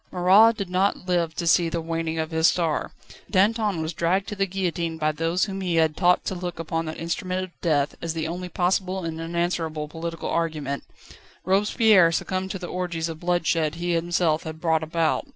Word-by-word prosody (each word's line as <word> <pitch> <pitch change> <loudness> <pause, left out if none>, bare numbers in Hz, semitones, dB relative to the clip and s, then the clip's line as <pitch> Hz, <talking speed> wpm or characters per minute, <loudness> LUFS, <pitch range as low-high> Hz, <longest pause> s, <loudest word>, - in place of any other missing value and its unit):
Marat 195 +6 +6
did 200 - -3
not 185 +1 0
live 170 -3 0
to 170 - -3
see 170 0 +4
the 170 - -2
waning 165 0 -3
of 160 +1 -2
his 160 +1 +4
star; 165 -4 0 0.4
Danton 205 -3 +2
was 160 +2 -3
dragged 185 +4 0
to 210 - -4
the 195 -1 0
guillotine 170 -3 -2
by 155 -1 +1
those 165 +3 0
whom 195 -2 -5
he 180 -3 -1
had 160 -2 +3
taught 180 -1 +3
to - - -2
look 180 -1 -5
upon 165 0 -3
that 155 - -5
instrument 185 +2 -2
of 185 -2 -12
death 145 -4 +1
as 165 -1 -3
the 160 -1 -2
only 180 +2 -5
possible 185 +1 0
and 165 0 -4
unanswerable 165 -2 -2
political 165 +2 -5
argument; 155 -4 -2 0.6
Robespierre 200 -1 +4
succumbed 185 +2 -2
to 195 - -3
the 180 - -7
orgies 170 -2 -3
of 160 -1 -7
bloodshed 165 -3 0
he 175 +1 -2
himself 170 -1 +1
had 160 -1 -7
brought 160 -1 +1
about. 160 - 0
170 Hz, 195 wpm, -24 LUFS, 160-185 Hz, 0.6 s, Marat